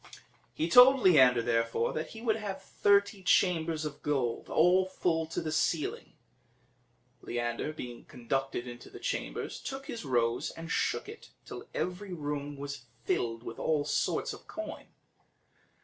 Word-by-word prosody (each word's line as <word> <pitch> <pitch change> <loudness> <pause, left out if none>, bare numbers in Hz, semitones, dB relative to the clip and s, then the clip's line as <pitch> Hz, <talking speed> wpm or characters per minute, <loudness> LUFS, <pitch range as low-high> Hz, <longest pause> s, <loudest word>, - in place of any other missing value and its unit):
He 160 - 0
told 250 +9 +8
Leander, 130 - +6
therefore, 115 0 0
that 155 - -3
he 225 0 -10
would 220 -2 +2
have 205 -3 -5
thirty 200 0 +2
chambers 165 -4 +2
of 150 -1 -6
gold, 130 -6 -1
all 180 +3 +4
full 165 -3 0
to 160 - -3
the 155 - -3
ceiling. 155 0 -1 1.1
Leander, 120 +4 -2
being 125 -6 -8
conducted 130 +1 -3
into 120 0 -9
the - - -11
chambers, - - -3
took 270 0 -6
his 235 -6 -6
rose 120 -4 +1
and 165 +1 -8
shook - - 0
it, 435 +2 -11 0.2
till - - -9
every 185 +1 -3
room 145 -2 -4
was 140 -3 -6 0.2
filled 115 0 -1
with 115 - -7
all 150 -2 +1
sorts - - 0
of - - -13
coin. 325 - -7
155 Hz, 150 wpm, -30 LUFS, 125-185 Hz, 1.1 s, told